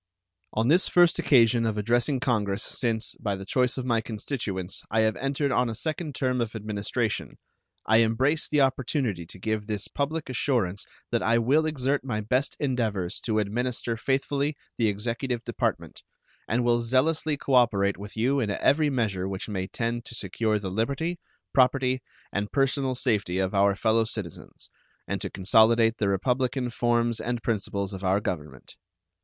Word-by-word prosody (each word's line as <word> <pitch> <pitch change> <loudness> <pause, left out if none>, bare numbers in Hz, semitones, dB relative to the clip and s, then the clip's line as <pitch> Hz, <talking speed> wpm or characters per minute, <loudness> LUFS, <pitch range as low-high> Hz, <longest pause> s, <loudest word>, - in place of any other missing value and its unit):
On 110 +2 +1
this 175 +7 +5
first 175 -1 +4
occasion 120 -7 +4
of 110 -2 -1
addressing 120 +5 +1
Congress 105 -6 0
since, 115 -2 -1
by 100 -2 -1
the 95 0 -8
choice 125 +5 +1
of 130 - -3
my 115 -3 +1
constituents, 105 -5 -4
I 110 +1 +2
have 110 -1 +2
entered 140 +1 -1
on 125 -1 +2
a 110 - -4
second 155 +1 -3
term 130 -2 0
of 115 -1 -3
administration, 105 +2 -2 0.5
I 110 - +4
embrace 130 +7 +2
the 150 -1 +2
opportunity 130 - 0
to - - -9
give 110 +2 -2
this 105 -3 -1
public 155 +3 -3
assurance 120 -7 -1 0.2
that - - +1
I 115 +1 +3
will 140 +7 +3
exert 140 -2 0
my 120 -5 -2
best 125 +6 -1
endeavors 110 -10 -1
to 110 -2 0
administer 115 +3 -1
faithfully 140 +4 -1 0.2
the 115 - +1
executive 115 +4 -2
department, - - -3 0.5
and 120 +3 +1
will 120 0 +3
zealously 145 +5 +1
cooperate 115 -8 +2
with 100 +2 -9
you 130 +5 +2
in 110 -5 -1
every 145 +9 +2
measure 105 -8 -1
which 95 -1 -4
may 95 -2 -3
tend 115 +2 -3
to 120 - -8
secure 110 +1 -1
the 100 -3 -5
liberty, 140 - -1 0.3
property, 130 0 +3 0.3
and 100 0 -2
personal 135 -1 +1
safety 105 -8 0
of 95 0 0
our 100 0 +3
fellow 110 +2 +2
citizens, 105 -7 -7 0.4
and - - -3
to - - -3
consolidate 115 +4 +4
the 100 - +1
republican 125 +5 0
forms 120 -1 +1
and 120 0 -3
principles 100 -3 -2
of 95 0 -7
our 95 +1 +2
Government. 75 -9 -6
115 Hz, 165 wpm, -26 LUFS, 105-130 Hz, 0.5 s, this